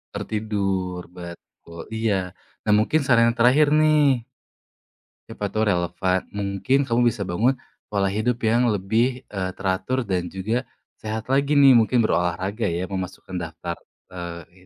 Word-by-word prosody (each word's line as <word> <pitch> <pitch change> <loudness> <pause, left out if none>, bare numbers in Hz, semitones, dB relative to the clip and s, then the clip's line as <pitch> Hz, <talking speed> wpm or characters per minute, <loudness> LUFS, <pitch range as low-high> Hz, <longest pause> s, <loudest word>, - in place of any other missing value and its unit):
Tertidur, 95 -4 -2
betul, 85 -1 -11 0.2
iya. 110 -1 +1 0.5
Nah 105 - +1
mungkin 155 +9 +2
saran 120 -3 +4
yang 115 - -11
terakhir 130 +6 +5
nih 145 -6 +3 1.0
Siapa 105 - -5
tahu 110 - +1
relevan, 90 +1 0
mungkin 100 +7 0
kamu 120 -3 +1
bisa 105 - -8
bangun 105 +8 +1 0.4
pola 100 -2 +1
hidup 115 +4 -1
yang 115 +2 +3
lebih, 115 +6 0
eee, 95 -2 -3
teratur 95 +7 -1
dan 95 -6 -2
juga 110 +7 -2 0.3
sehat 110 +2 -5
lagi 140 +2 +2
nih, 135 -3 +8
mungkin 115 +2 +3
berolahraga 95 +2 0
ya 85 +2 -2
memasukkan 95 -1 -5
daftar, 85 0 -5 0.3
eee, 85 +1 -9
105 Hz, 135 wpm, -23 LUFS, 90-120 Hz, 1.0 s, nih